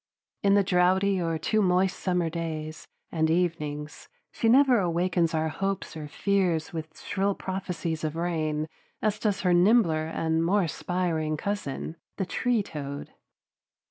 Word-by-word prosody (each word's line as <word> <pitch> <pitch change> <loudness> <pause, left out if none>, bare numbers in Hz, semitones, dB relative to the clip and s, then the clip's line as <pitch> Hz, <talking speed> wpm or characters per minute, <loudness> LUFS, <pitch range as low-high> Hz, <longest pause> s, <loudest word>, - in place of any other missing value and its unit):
In 200 0 +4
the 200 - +5
drouthy 185 +1 +3
or 165 -1 0
too 215 +7 +1
moist 185 0 +2
summer 180 -2 0
days 160 -1 -5 0.2
and 160 -1 +1
evenings, 155 -3 -2 0.2
she 225 - +1
never 260 -1 +6
awakens 170 -2 +1
our 160 0 +1
hopes 195 +4 -3
or 155 -2 -6
fears 180 -1 0
with 160 -1 -6
shrill 200 0 -1
prophecies 180 -4 -4
of 155 0 -2
rain 155 -3 -1 0.4
as 215 -1 +1
does 205 -3 0
her 180 -2 +3
nimbler 175 -4 +4
and 160 0 0
more 195 +4 +3
aspiring 165 -2 -1
cousin, 170 -4 -4 0.2
the 195 - -1
tree 240 +2 0
toad. 145 -4 -6
175 Hz, 140 wpm, -27 LUFS, 160-195 Hz, 0.4 s, never